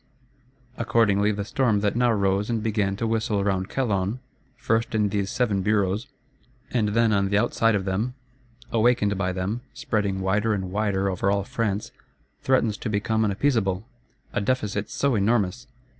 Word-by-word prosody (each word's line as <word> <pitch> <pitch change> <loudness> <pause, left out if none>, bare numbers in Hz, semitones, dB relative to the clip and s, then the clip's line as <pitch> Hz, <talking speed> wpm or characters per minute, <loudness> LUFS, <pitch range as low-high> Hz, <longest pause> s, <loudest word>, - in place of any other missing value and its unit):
Accordingly, 105 -3 +2
the 100 -1 -3
storm 110 -3 +1
that 105 +1 0
now 120 0 +3
rose 100 0 +1
and 115 -2 -1
began 105 -3 0
to 115 - -2
whistle 110 -2 0
round 95 -1 -1
Calonne, 105 -3 -1 0.4
first 115 0 0
in 105 -2 +2
these 100 -1 -1
Seven 105 -5 0
Bureaus, 105 +3 +1 0.6
and 110 -4 +1
then 115 -2 +3
on 100 -1 +2
the 100 - +2
outside 115 +1 +2
of 95 -2 -1
them, 105 +7 -1 0.6
awakened 115 -3 +2
by 95 -1 -1
them, 95 +6 -3
spreading 100 -3 -1
wider 105 +3 +1
and 95 -2 -4
wider 100 -1 0
over 95 +1 0
all 100 0 +1
France, 110 -3 -2 0.5
threatens 115 -5 +2
to 115 - -4
become 110 +1 0
unappeasable. 100 -3 +1 0.5
A - - 0
Deficit 105 -3 -1
so 140 -1 0
enormous! 110 +2 +1
105 Hz, 160 wpm, -25 LUFS, 100-115 Hz, 0.6 s, now